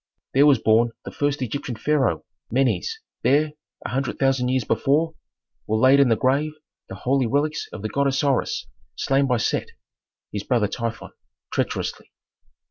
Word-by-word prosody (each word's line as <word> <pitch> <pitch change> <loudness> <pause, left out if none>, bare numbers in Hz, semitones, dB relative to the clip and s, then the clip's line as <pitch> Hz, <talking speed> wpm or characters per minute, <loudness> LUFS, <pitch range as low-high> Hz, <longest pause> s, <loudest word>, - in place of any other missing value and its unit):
There 140 +2 +6
was 140 -3 +6
born 115 +1 +3
the - - -6
first 145 -2 -1
Egyptian 125 0 -4
pharaoh, 130 - 0 0.2
Menes, 135 - 0 0.2
there, 145 +5 +3 0.3
a - - -2
hundred 135 +2 -2
thousand 135 -2 +2
years 130 -1 +1
before, 155 +8 +1 0.5
were 110 - +1
laid 130 +4 +6
in 140 -3 +5
the 115 - +4
grave 140 +6 +1 0.4
the - - -6
holy 130 -1 +1
relics 150 +4 0
of - - -8
the 110 - -2
god 140 +5 +1
Osiris 135 0 0 0.3
slain 135 +1 +1
by 125 -2 +2
Set 115 - 0 0.6
(his 105 - -3
brother 115 -2 +1
Typhon) 115 +1 -5 0.4
treacherously. - - -2
135 Hz, 155 wpm, -23 LUFS, 120-140 Hz, 0.6 s, There